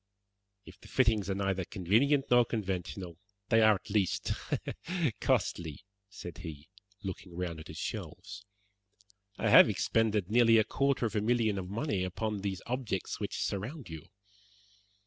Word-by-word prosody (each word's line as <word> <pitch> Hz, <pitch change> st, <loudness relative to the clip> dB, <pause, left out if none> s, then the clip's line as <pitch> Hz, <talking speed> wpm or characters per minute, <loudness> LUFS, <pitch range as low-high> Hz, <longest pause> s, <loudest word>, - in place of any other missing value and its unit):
"If -, -, -14 dB
the -, -, -13 dB
fittings 105 Hz, -4 st, +2 dB
are 95 Hz, -, 0 dB
neither 95 Hz, -1 st, -1 dB
convenient 115 Hz, -, +2 dB
nor 120 Hz, 0 st, +7 dB
conventional, 95 Hz, -5 st, -4 dB, 0.3 s
they 115 Hz, -1 st, +5 dB
are 110 Hz, -1 st, +6 dB
at 95 Hz, -, -9 dB
least 100 Hz, -3 st, +1 dB, 0.9 s
costly," 80 Hz, +1 st, -1 dB, 0.2 s
said 85 Hz, -4 st, -9 dB
he, 80 Hz, -1 st, -9 dB, 0.3 s
looking 95 Hz, -2 st, -6 dB
round 85 Hz, -3 st, -3 dB
at 80 Hz, -, -10 dB
his -, -, -9 dB
shelves. 105 Hz, -1 st, -6 dB, 0.9 s
"I -, -, 0 dB
have -, -, +9 dB
expended 105 Hz, -4 st, +1 dB
nearly 115 Hz, -1 st, +6 dB
a 110 Hz, -, +5 dB
quarter 140 Hz, +1 st, 0 dB
of 110 Hz, -, -3 dB
a 105 Hz, -, +2 dB
million 110 Hz, -2 st, +1 dB
of 90 Hz, -1 st, -6 dB
money 105 Hz, -3 st, -1 dB
upon 105 Hz, +3 st, -2 dB
these 95 Hz, -2 st, -4 dB
objects 120 Hz, -7 st, -3 dB
which -, -, -3 dB
surround 115 Hz, -, -4 dB
you. 80 Hz, -1 st, -8 dB
100 Hz, 145 wpm, -31 LUFS, 90-115 Hz, 0.9 s, have